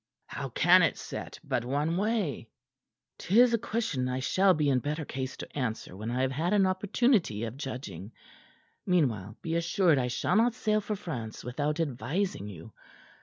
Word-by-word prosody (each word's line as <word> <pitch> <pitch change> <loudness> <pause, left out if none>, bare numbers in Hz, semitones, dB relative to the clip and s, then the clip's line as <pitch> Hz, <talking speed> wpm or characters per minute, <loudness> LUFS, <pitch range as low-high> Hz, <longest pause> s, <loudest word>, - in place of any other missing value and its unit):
"How 135 -1 -5
can 175 +9 +5
it 165 - +2
set - - -7
but 120 - -1
one 145 +6 0
way?" 195 - -1 0.7
"'Tis 235 +6 +4
a 230 - +3
question 210 - -1
I 130 +1 -1
shall 185 +8 +3
be 150 -1 +1
in 135 -2 +3
better 150 +4 -3
case 130 -1 -5
to - - -9
answer 115 -8 -3
when 110 +4 -5
I 125 +2 -1
have 130 - +1
had 165 +8 0
an 200 -2 +4
opportunity 185 - +1
of 115 +1 -4
judging. 125 - -6 0.7
Meanwhile, 120 - 0
be 165 - -2
assured 165 -2 +3
I 125 - 0
shall 120 - 0
not 235 +1 +3
sail 215 -3 +1
for 210 +1 -3
France 125 - -6
without 145 +6 -2
advising 145 - -2
you. 100 +2 -10
150 Hz, 170 wpm, -29 LUFS, 125-190 Hz, 0.7 s, can